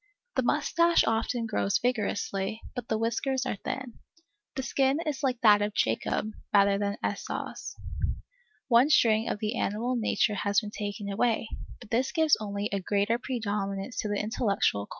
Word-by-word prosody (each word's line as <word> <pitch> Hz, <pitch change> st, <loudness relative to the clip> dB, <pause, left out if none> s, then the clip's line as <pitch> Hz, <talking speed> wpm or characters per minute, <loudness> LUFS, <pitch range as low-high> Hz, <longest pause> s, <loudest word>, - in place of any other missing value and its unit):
The -, -, +3 dB
moustache 335 Hz, 0 st, +3 dB
often 230 Hz, +1 st, 0 dB
grows 205 Hz, -2 st, +1 dB
vigorously, 210 Hz, -3 st, -1 dB
but 245 Hz, -3 st, -5 dB
the 220 Hz, -, 0 dB
whiskers 255 Hz, +4 st, -1 dB
are 235 Hz, -, -2 dB
thin. 255 Hz, +2 st, -5 dB, 0.6 s
The 265 Hz, -, -2 dB
skin 270 Hz, +2 st, +2 dB
is 290 Hz, -3 st, -2 dB
like 255 Hz, -4 st, 0 dB
that 210 Hz, -2 st, +6 dB
of 205 Hz, 0 st, -1 dB
Jacob, 115 Hz, -, 0 dB, 0.2 s
rather 200 Hz, -1 st, +4 dB
than 205 Hz, 0 st, -1 dB
like -, -, +1 dB
Esau's. -, -, -5 dB, 0.9 s
One 245 Hz, +2 st, +5 dB
string 225 Hz, -6 st, +4 dB
of -, -, -1 dB
the 215 Hz, +3 st, -2 dB
animal 235 Hz, +5 st, -1 dB
nature 220 Hz, -1 st, +1 dB
has 200 Hz, 0 st, +2 dB
been 210 Hz, -2 st, -7 dB
taken 205 Hz, -1 st, -5 dB
away, 225 Hz, +2 st, 0 dB, 0.3 s
but -, -, -14 dB
this 250 Hz, +3 st, +1 dB
gives 320 Hz, -2 st, +4 dB
only 205 Hz, -1 st, -3 dB
a 200 Hz, -, 0 dB
greater 205 Hz, +4 st, +1 dB
predominance 205 Hz, -3 st, -3 dB
to -, -, -1 dB
the 205 Hz, -, 0 dB
intellectual 200 Hz, -, 0 dB
chords. -, -, -45 dB
220 Hz, 170 wpm, -28 LUFS, 205-245 Hz, 0.9 s, that